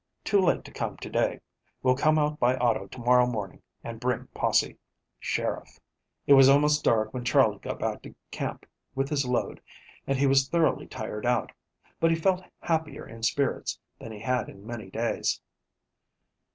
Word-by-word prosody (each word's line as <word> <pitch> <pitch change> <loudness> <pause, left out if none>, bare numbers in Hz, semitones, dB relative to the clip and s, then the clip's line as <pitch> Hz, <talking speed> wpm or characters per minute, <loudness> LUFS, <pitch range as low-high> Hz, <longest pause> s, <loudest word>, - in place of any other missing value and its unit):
Too 200 -2 +3
late 180 - +2
to - - -11
come - - -4
to - - -8
day. - - 0 0.4
Will 130 0 +4
come 155 +3 +3
out 150 0 0
by 125 +1 +3
auto 115 -5 +1
to 125 - -11
morrow 125 +1 +4
morning 105 -6 -5 0.2
and 115 -1 -7
bring 125 0 -1
posse." - - +1 0.4
"SHERIFF." - - -3 0.5
It 145 - +6
was 135 -1 +8
almost 150 +2 +4
dark 110 -1 +2
when 125 -1 -4
Charley 120 - +3
got - - -5
back - - -3
to - - -12 0.2
camp - - -5 0.3
with 135 +1 -1
his 140 -4 0
load, 125 -1 -1 0.5
and 135 - +1
he 140 - +2
was 135 0 +3
thoroughly 170 -2 +1
tired 105 +3 -5
out, 120 -1 +1 0.5
but 165 - +3
he 165 - +3
felt 185 +3 +1 0.2
happier 160 -3 -2
in 115 0 -11
spirits 130 +4 0 0.2
than 115 - -8
he 105 -1 -9
had 125 -1 -1
in 100 +1 -14
many 110 -4 -7
days. 115 +4 -1
130 Hz, 180 wpm, -27 LUFS, 115-150 Hz, 0.5 s, was